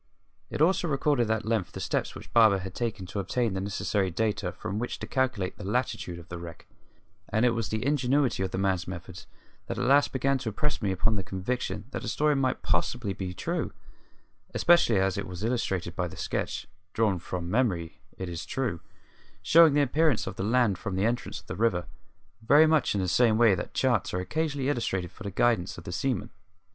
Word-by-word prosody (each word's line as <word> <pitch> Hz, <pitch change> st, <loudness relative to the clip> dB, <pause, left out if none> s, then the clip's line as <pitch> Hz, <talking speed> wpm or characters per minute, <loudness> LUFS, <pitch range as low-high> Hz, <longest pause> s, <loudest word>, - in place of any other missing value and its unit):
It 150 Hz, -, +1 dB
also 175 Hz, +1 st, +2 dB
recorded 135 Hz, -5 st, +1 dB
at 110 Hz, -1 st, 0 dB
length 110 Hz, -5 st, -1 dB
the -, -, -6 dB
steps -, -, -2 dB
which -, -, -11 dB
Barber 110 Hz, -4 st, +6 dB
had 95 Hz, -1 st, -6 dB
taken 110 Hz, -5 st, -3 dB
to 95 Hz, +3 st, -5 dB
obtain 115 Hz, +2 st, 0 dB
the 95 Hz, -, -2 dB
necessary 100 Hz, 0 st, -1 dB
data 105 Hz, 0 st, -1 dB
from 100 Hz, +4 st, -5 dB
which 120 Hz, -, -3 dB
to -, -, -6 dB
calculate 125 Hz, -8 st, -1 dB
the -, -, -6 dB
latitude 100 Hz, -4 st, -2 dB
of 85 Hz, 0 st, -12 dB
the 85 Hz, -1 st, -7 dB
wreck; 85 Hz, -2 st, -9 dB, 0.6 s
and 110 Hz, +3 st, +2 dB
it 125 Hz, -, +4 dB
was 115 Hz, -3 st, -2 dB
the 110 Hz, +2 st, -2 dB
ingenuity 140 Hz, -4 st, +2 dB
of 95 Hz, -, 0 dB
the 90 Hz, -, -4 dB
man's 95 Hz, -2 st, 0 dB
methods 90 Hz, 0 st, -8 dB, 0.4 s
that -, -, -4 dB
at -, -, -1 dB
last 140 Hz, +3 st, +4 dB
began 135 Hz, +1 st, +1 dB
to 115 Hz, -, -3 dB
impress 150 Hz, +8 st, -1 dB
upon 100 Hz, +2 st, +1 dB
me -, -, -1 dB
the -, -, -9 dB
conviction 100 Hz, +2 st, -3 dB
that -, -, -4 dB
the -, -, -6 dB
story 150 Hz, 0 st, +2 dB
might 130 Hz, -2 st, 0 dB
possibly 100 Hz, +5 st, 0 dB
be 90 Hz, -2 st, -5 dB
true, -, -, -2 dB, 0.8 s
especially 170 Hz, -, +5 dB
as 95 Hz, +1 st, +1 dB
it 100 Hz, -, -4 dB
was 90 Hz, +2 st, -7 dB
illustrated 95 Hz, -7 st, -1 dB
by 90 Hz, -1 st, -1 dB
a 80 Hz, -, -10 dB
sketch -, -, -3 dB, 0.3 s
drawn 105 Hz, -5 st, +1 dB
from 85 Hz, 0 st, -5 dB
memory, 90 Hz, -6 st, 0 dB, 0.2 s
it 95 Hz, -, -4 dB
is 85 Hz, -2 st, -5 dB
true 125 Hz, -10 st, -2 dB, 0.6 s
showing 160 Hz, +6 st, +6 dB
the 145 Hz, -, +4 dB
appearance 145 Hz, -1 st, +2 dB
of -, -, -5 dB
the -, -, -5 dB
land 110 Hz, -2 st, +2 dB
from 95 Hz, -4 st, -4 dB
the 95 Hz, +2 st, +1 dB
entrance 120 Hz, +1 st, -2 dB
of -, -, -19 dB
the -, -, -6 dB
river, 95 Hz, -6 st, +1 dB, 0.6 s
very 145 Hz, +7 st, +6 dB
much 155 Hz, -7 st, +2 dB
in 100 Hz, -, +1 dB
the 95 Hz, -, -1 dB
same 110 Hz, +3 st, +4 dB
way 115 Hz, -3 st, +6 dB
that 90 Hz, -, -4 dB
charts 120 Hz, -8 st, +1 dB
are -, -, 0 dB
occasionally 140 Hz, -, -1 dB
illustrated 95 Hz, -, -1 dB
for -, -, -20 dB
the 100 Hz, -, -4 dB
guidance 100 Hz, -2 st, +1 dB
of 85 Hz, -, -9 dB
the -, -, -6 dB
seaman. 125 Hz, +2 st, -2 dB
110 Hz, 210 wpm, -28 LUFS, 95-125 Hz, 0.8 s, Barber